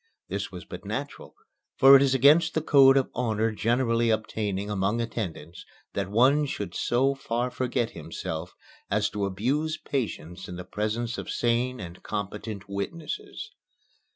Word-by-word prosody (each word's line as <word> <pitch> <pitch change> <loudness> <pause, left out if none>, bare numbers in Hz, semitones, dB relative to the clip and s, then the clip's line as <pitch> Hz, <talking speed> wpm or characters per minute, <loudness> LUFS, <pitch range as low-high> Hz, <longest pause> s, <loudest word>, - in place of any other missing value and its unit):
This - - -3
was - - -9
but - - -9
natural, - - -6 0.4
for 135 +1 +9
it 135 - +7
is 135 -1 +3
against 155 +6 +5
the 160 - +2
code 135 -3 +6
of 135 - +1
honor 110 -2 0
generally 115 +1 +1
obtaining 105 -2 -1
among 105 +2 0
attendants, 90 -8 -5 0.3
that 100 -1 -2
one 135 +8 +4
should 100 -9 -4
so 130 +3 +1
far 125 -2 -2
forget 120 -1 -1
himself 80 +1 -6 0.3
as 105 +1 +1
to 105 -1 -1
abuse 135 - -1
patients 95 - -4
in 90 - -6
the 90 0 -7
presence 110 +5 -2
of - - -7
sane 120 +2 0
and 85 -2 -8
competent 100 0 -5
witnesses. 380 - -5
115 Hz, 150 wpm, -27 LUFS, 100-135 Hz, 0.4 s, for